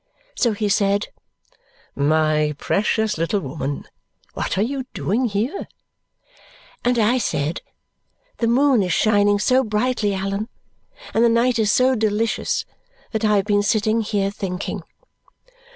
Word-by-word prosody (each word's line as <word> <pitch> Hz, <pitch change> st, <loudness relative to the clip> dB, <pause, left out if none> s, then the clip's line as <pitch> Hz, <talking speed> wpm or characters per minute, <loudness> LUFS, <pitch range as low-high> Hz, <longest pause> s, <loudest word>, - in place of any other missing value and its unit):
So 235 Hz, -3 st, +1 dB
he 210 Hz, 0 st, -1 dB
said, 200 Hz, 0 st, +1 dB, 0.8 s
"My 155 Hz, +1 st, +1 dB
precious 210 Hz, +2 st, 0 dB
little 170 Hz, +5 st, 0 dB
woman, 140 Hz, -1 st, -4 dB, 0.5 s
what -, -, -3 dB
are 200 Hz, -, +3 dB
you 265 Hz, +2 st, -3 dB
doing 230 Hz, +7 st, 0 dB
here?" 230 Hz, -, -2 dB, 1.2 s
And 245 Hz, 0 st, +2 dB
I 235 Hz, +3 st, +3 dB
said, 150 Hz, -6 st, -2 dB, 0.8 s
"The 230 Hz, -, +1 dB
moon 255 Hz, 0 st, +4 dB
is 180 Hz, -3 st, 0 dB
shining 205 Hz, -1 st, +3 dB
so 255 Hz, +5 st, +3 dB
brightly, 215 Hz, -2 st, 0 dB
Allan, 195 Hz, +3 st, -3 dB, 0.6 s
and 225 Hz, -, +3 dB
the 235 Hz, -, +5 dB
night 235 Hz, +1 st, +2 dB
is 210 Hz, -2 st, +3 dB
so 255 Hz, +3 st, +4 dB
delicious, 220 Hz, -1 st, 0 dB, 0.5 s
that 220 Hz, -1 st, -2 dB
I 210 Hz, -1 st, +3 dB
have 200 Hz, -1 st, +2 dB
been 205 Hz, -1 st, +2 dB
sitting 215 Hz, +2 st, +1 dB
here 205 Hz, -2 st, -1 dB
thinking." 190 Hz, -3 st, -4 dB
210 Hz, 135 wpm, -21 LUFS, 195-230 Hz, 1.2 s, the